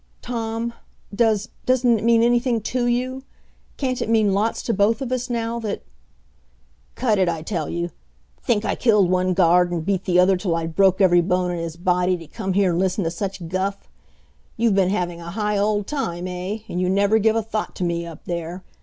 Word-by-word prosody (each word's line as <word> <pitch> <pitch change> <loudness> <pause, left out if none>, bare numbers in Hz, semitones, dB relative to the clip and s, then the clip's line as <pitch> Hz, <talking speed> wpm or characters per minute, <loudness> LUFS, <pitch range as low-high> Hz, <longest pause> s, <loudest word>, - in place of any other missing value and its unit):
"Tom 230 -1 -3 0.4
does 220 -1 +1 0.2
doesn't 250 -3 +3
it - - -7
mean 230 0 +4
anything 240 0 +2
to 245 +3 -1
you? 255 +2 -1 0.6
Can't 255 -3 -2
it - - -2
mean 215 -3 +3
lots 210 +3 0
to 230 - -1
both 205 +4 +2
of 265 -3 -4
us 255 0 -2
now 235 -1 -2
that 220 -3 -4 0.6
" - - -38
"Cut 220 -5 +1
it, 185 -2 +3
I 165 -2 -3
tell 165 -4 -3
you! 170 0 -3 0.5
Think 220 -4 0
I - - +1
killed 210 -7 +3
one 185 0 +1
guard 180 0 +4
and 170 -2 -3
beat 195 -1 -1
the 180 -1 +3
other 185 +1 +4
till 180 -2 -1
I'd 165 -1 -3
broke 195 0 +4
every 175 -2 +5
bone 180 0 0
in 175 - -3
his 165 -1 -5
body 180 +1 +1
to 165 - -11
come 190 +5 -4
here 195 -1 +3
and 170 - 0
listen 190 +1 0
to 165 - -1
such 190 -1 -5
guff? 190 +3 -3 0.7
You've 230 -2 +2
been 190 -2 +3
having 175 -3 -2
a 170 - -7
high 210 +1 -1
old 205 0 +1
time, 185 - -3
eh, 185 +4 -4
and 180 - -3
you 180 - +1
never 200 +3 +3
give 220 +1 +3
a 225 - +1
thought 215 0 -4
to 185 - -3
me 170 -1 -1
up 165 -2 -10
there! 175 +1 -5
195 Hz, 215 wpm, -22 LUFS, 175-225 Hz, 0.7 s, every